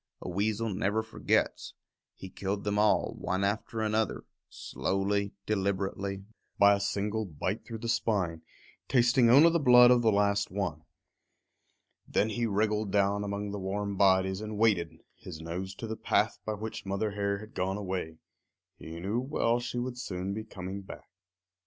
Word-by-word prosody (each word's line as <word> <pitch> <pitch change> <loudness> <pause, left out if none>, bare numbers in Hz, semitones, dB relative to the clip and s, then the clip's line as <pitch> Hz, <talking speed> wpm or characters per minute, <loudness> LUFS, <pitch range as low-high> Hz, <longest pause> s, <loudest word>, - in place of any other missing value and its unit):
A - - -8
weasel 105 +4 -1
never 105 +3 0
forgets. 110 - -1 0.4
He 95 - -10
killed 100 +2 -3
them 105 0 0
all, 105 0 +3
one 95 +2 -1
after 110 +2 -1
another, 110 0 0 0.3
slowly, 100 +1 -2
deliberately, 100 -1 -2 0.3
by 100 0 +7
a 100 - 0
single 100 +2 -1
bite 90 +3 -4
through 115 - -5
the 115 - -6
spine, 95 -8 0 0.5
tasting 120 -1 +4
only 145 +7 +7
the 170 - +2
blood 125 -3 +7
of 125 -1 +5
the 115 -2 +3
last 100 0 +2
one. 90 -6 -3 1.2
Then 105 - +1
he 115 +2 -1
wriggled 105 0 0
down 100 0 +2
among 100 0 -3
the 100 - -4
warm 100 +1 -3
bodies 95 0 +3
and 110 -1 -5
waited, 85 -8 +1
his 85 -4 -9
nose 90 +4 -5
to 115 - -6
the 110 0 -4
path - - +1
by 110 - 0
which 110 +2 -6
Mother 100 +2 -2
Hare 100 0 -1
had 110 +2 -11
gone 95 +2 -1
away. 90 -5 -4 0.6
He 80 +1 -8
knew 100 +7 -1
well 125 -3 0
she 120 0 -5
would 125 0 -3
soon 95 -5 -4
be 110 +2 -4
coming 95 -2 -7
back. 95 - -12
100 Hz, 165 wpm, -29 LUFS, 95-110 Hz, 1.2 s, by